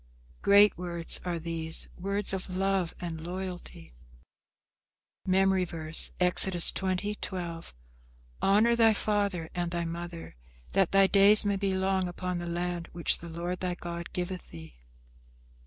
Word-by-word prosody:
Great 205 +1 +6
words 170 -2 0
are 175 -2 -2
these, 165 -1 -5
words 200 +2 -1
of 190 -1 -4
love 190 -1 0
and 165 -2 -6
loyalty. 175 - -7 1.3
MEMORY 190 0 +3
VERSE, 165 -2 +1
Exodus 180 0 +4
20: 190 +2 -2
12 170 - -6 0.7
"Honour 215 +4 +4
thy 225 -2 +4
father 200 -6 -1
and 175 -1 -2
thy 170 0 -3
mother; 170 - -7 0.4
that 195 -3 +2
thy 195 0 +5
days 200 +2 +5
may 200 -1 +1
be 195 -1 -1
long 190 -1 0
upon 180 0 -4
the 175 - -5
land 175 0 -3
which 170 -1 0
the 170 - -9
Lord 175 +2 -4
thy 180 -1 -2
God 170 -1 -7
giveth 180 0 -5
thee." 80 -6 -12
180 Hz, 140 wpm, -28 LUFS, 170-195 Hz, 1.3 s, Great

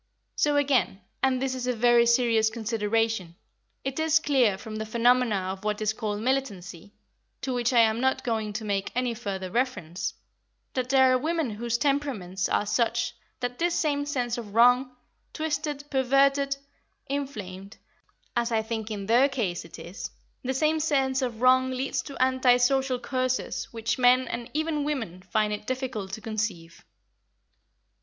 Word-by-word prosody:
So, 295 -1 +2
again, 255 -10 +2 0.2
and 265 -1 +2
this 265 0 -1
is 255 -1 -4
a 250 - +2
very 235 +1 +4
serious 235 -2 +3
consideration, 220 -4 -1 0.5
it 270 +2 -3
is 320 0 +4
clear 260 -10 +2
from 215 +2 -7
the 220 - -3
phenomena 230 -4 +2
of 190 +1 -8
what 210 0 -1
is 215 0 0
called 210 -2 -3
militancy, 205 -8 -3 0.5
to 260 - -2
which 240 0 +1
I 240 -2 +6
am 225 +1 +2
not 265 0 +1
going 220 -3 -1
to 215 +1 -4
make 200 -1 -1
any 250 -1 0
further 195 -5 -5
reference, 205 -9 -2 0.6
that 255 -1 -2
there 265 -1 +5
are 255 - +3
women 320 -3 -1
whose 235 +2 -2
temperaments 240 -10 -1
are - - +1
such 235 +2 0 0.3
that 245 0 -3
this 345 0 +1
same 285 -2 0
sense 245 -5 -1
of 210 -3 -9
wrong, 250 +2 +5 0.4
twisted, 300 -2 -2
perverted, 275 +1 +3 0.5
inflamed, 205 -9 -5 0.6
as 240 0 0
I 220 -1 +1
think 220 -1 -4
in 205 -2 -4
their 245 +6 +4
case 210 -11 -2
it 165 - -11
is, 180 +6 -7 0.3
the 260 +1 -2
same 310 +3 +2
sense 270 -3 +1
of 240 -3 -3
wrong 260 0 +5
leads 260 +1 -2
to 280 - -9
anti 255 -1 +4
social 265 +1 +2
courses 255 +1 -2
which 225 +1 -3
men 255 +1 +5
and 235 +1 -5
even 310 -1 0
women 230 - -3
find 210 +3 0
it 210 0 -6
difficult 255 -7 -3
to 220 - -5
conceive." 210 -7 -4
245 Hz, 165 wpm, -27 LUFS, 215-265 Hz, 0.6 s, I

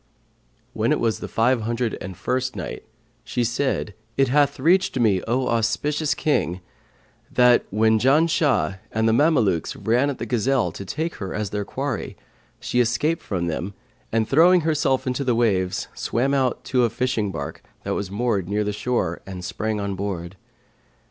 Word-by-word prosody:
When - - 0
it - - +2
was 115 -2 0
the - - -5
Five 120 +2 +2
Hundred 115 +1 -1
and 95 -3 -7
First 130 +1 -1
Night, - - -6 0.4
She 125 - -1
said, 120 -2 -1 0.2
It 135 -1 +3
hath 145 +1 +2
reached 170 -1 +3
me, 105 -6 +3
O 125 +3 +1
auspicious 140 +7 0
King, 90 - 0 0.7
that 125 -1 +5
"when 110 +2 +3
Janshah 145 - +2
and 110 +1 +1
the 110 - +3
Mamelukes 120 - +2
ran 125 +5 +1
at 140 - -3
the - - -4
gazelle, 125 +2 +1
to - - -8
take 160 - -3
her 95 -2 -5
as 105 -3 -3
their 105 0 -2
quarry, 135 -2 -4 0.4
she 125 - -1
escaped 135 +7 +1
from 90 -4 -2
them 85 +4 -3 0.4
and, 110 -1 +1
throwing 175 +5 +5
herself 150 -4 +1
into 130 +2 -1
the 125 -3 +1
waves, 95 -6 +1
swam 130 +4 -1
out 130 -3 0
to 125 -2 +1
a 120 - +3
fishing 115 -3 -1
bark, 70 -5 -6 0.2
that - - -2
was 100 -2 -3
moored 100 -3 -1
near 105 +1 0
the 105 0 -2
shore, 105 -6 -1
and 90 -2 -7
sprang 110 +4 -2
on 100 -1 -2
board. 95 -2 -4
115 Hz, 170 wpm, -23 LUFS, 100-135 Hz, 0.7 s, that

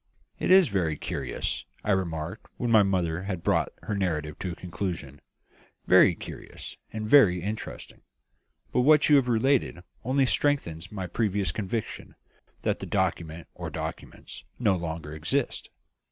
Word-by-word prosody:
"It - - -1
is 185 -1 +7
very 85 -7 0
curious," 65 -3 -3 0.2
I 105 - 0
remarked, 85 0 -2
when 120 -1 -1
my 110 -2 +7
mother 90 -4 0
had 95 -4 -4
brought - - +2
her 110 - -3
narrative 80 -6 -2
to 90 - -3
a - - -9
conclusion 85 -6 -5 0.6
"very - - +6
curious, - - -9 0.2
and 110 -1 -4
very 100 - +6
interesting. 105 +2 -6 0.7
But 125 - +3
what 150 +3 +5
you 145 - +8
have 130 -2 +2
related 120 -5 +1 0.2
only 135 +2 +2
strengthens 90 - 0
my 95 -3 -4
previous 100 -1 0
conviction, 105 +4 -4 0.5
that - - 0
the - - -6
document 80 0 -1
or - - -6
documents - - -7
no 105 -6 +2
longer 80 -3 -5
exist. 100 - -2
95 Hz, 145 wpm, -27 LUFS, 85-115 Hz, 0.7 s, you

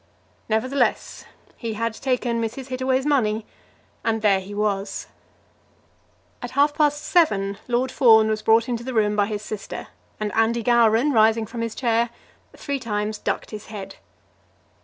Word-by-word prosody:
Nevertheless 255 +6 0 0.3
he 225 -3 -5
had 230 +1 -1
taken 245 -1 -1
Mrs. 245 +4 -5
Hittaway's 260 +1 0
money 225 -7 +1 0.6
and 225 -1 -1
there 200 -2 +4
he 190 +2 -10
was. 200 -1 -2 1.4
At 245 - -5
half 290 +1 +4
past 295 -1 +1
seven 200 - +2
Lord 250 +1 0
Fawn 220 -4 +6
was 215 0 -1
brought 225 +1 +4
into 235 -2 -3
the 260 0 -5
room 210 -1 +2
by 205 -1 +2
his 210 -1 -4
sister, 210 -1 -7 0.3
and 210 -1 -3
Andy 225 +1 +1
Gowran, 235 +4 +4
rising 220 0 +4
from 230 +1 -6
his 230 -1 -3
chair, 235 -1 +1 0.5
three 280 -1 -3
times 210 -2 -3
ducked - - -3
his 215 -1 -8
head. 205 -3 -8
225 Hz, 150 wpm, -23 LUFS, 215-255 Hz, 1.4 s, Fawn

